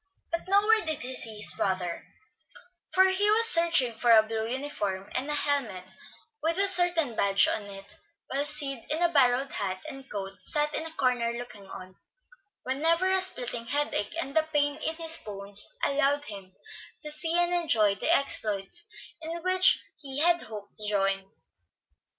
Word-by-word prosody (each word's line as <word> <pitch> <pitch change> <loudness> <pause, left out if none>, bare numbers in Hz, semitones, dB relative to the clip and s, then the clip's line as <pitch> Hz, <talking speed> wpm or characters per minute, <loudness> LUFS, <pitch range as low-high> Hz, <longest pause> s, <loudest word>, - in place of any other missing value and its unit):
But 335 +2 -4
nowhere 420 +3 +4
did 315 -2 -3
he 260 +1 -4
see 220 -3 -4
his 210 - +3
brother; 185 -3 -3 0.8
for 375 - +5
he 400 +2 +2
was 455 +2 +4
searching 335 - +3
for 235 +2 -1
a 220 -1 +7
blue 220 0 -4
uniform 210 -8 -4
and 265 +3 -2
a 295 - 0
helmet 230 -12 -1 0.5
with 330 +2 -1
a 395 0 +3
certain 350 - +1
badge 200 -1 +3
on 210 - -2
it, 195 0 -11 0.3
while 275 +2 -2
Sid 285 -4 -2
in 315 +4 0
a 345 - +4
borrowed 270 -3 +2
hat 190 0 -3
and 270 -3 -9
coat 195 -1 -7
sat 300 0 -1
in 320 - -2
a 320 - -10
corner 250 -5 0
looking 220 -5 -10
on, 185 0 -11 0.7
whenever 330 +8 +1
a 380 0 +4
splitting 245 -10 -2
headache 285 -5 -2
and 275 -3 -4
the 320 - +5
pain 290 -1 +1
in 320 - -3
his 325 0 0
bones 200 -2 0
allowed 285 +1 +1
him 195 -5 -9 0.5
to 300 - -1
see 325 +3 +5
and 350 0 +2
enjoy 230 - +3
the 200 - -1
exploits 225 - 0 0.3
in 330 +1 -6
which 370 0 +4 0.2
he 270 -2 -5
had 345 +3 +3
hoped 210 -2 -9
to 210 -1 -4
join. 195 -1 -1
275 Hz, 170 wpm, -27 LUFS, 210-330 Hz, 0.8 s, a